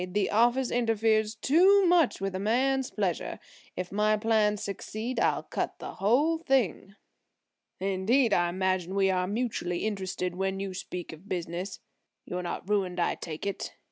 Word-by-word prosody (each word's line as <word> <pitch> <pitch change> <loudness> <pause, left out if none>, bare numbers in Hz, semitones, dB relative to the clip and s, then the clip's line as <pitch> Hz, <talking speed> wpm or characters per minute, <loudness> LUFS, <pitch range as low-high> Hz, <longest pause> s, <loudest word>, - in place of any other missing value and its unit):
The 205 -1 +1
office 240 +4 +3
interferes 225 -2 +1
too 370 - +5
much 345 -5 +3
with 195 0 -2
a 185 - -3
man's 260 +5 +1
pleasure. 190 -6 -2 0.4
If 180 0 -4
my 210 +1 +2
plans 210 -1 +2
succeed 215 +4 -4
I'll - - +1
cut - - -3
the - - -7
whole 285 +11 +2
thing." 260 - 0 0.8
"Indeed! 200 +6 +2
I 175 0 +3
imagine 185 0 -1
we 195 -1 +3
are 180 -1 0
mutually 205 -5 -2
interested 190 -3 -2
when 190 +1 -2
you 195 -1 -4
speak 180 -2 -6
of 165 +6 -14
'business.' 180 +2 -4 0.4
You're 180 0 -4
not 175 +1 -5
ruined 190 -3 0
I 170 - +2
take 160 0 -7
it. 200 - -4
200 Hz, 155 wpm, -28 LUFS, 185-235 Hz, 0.8 s, too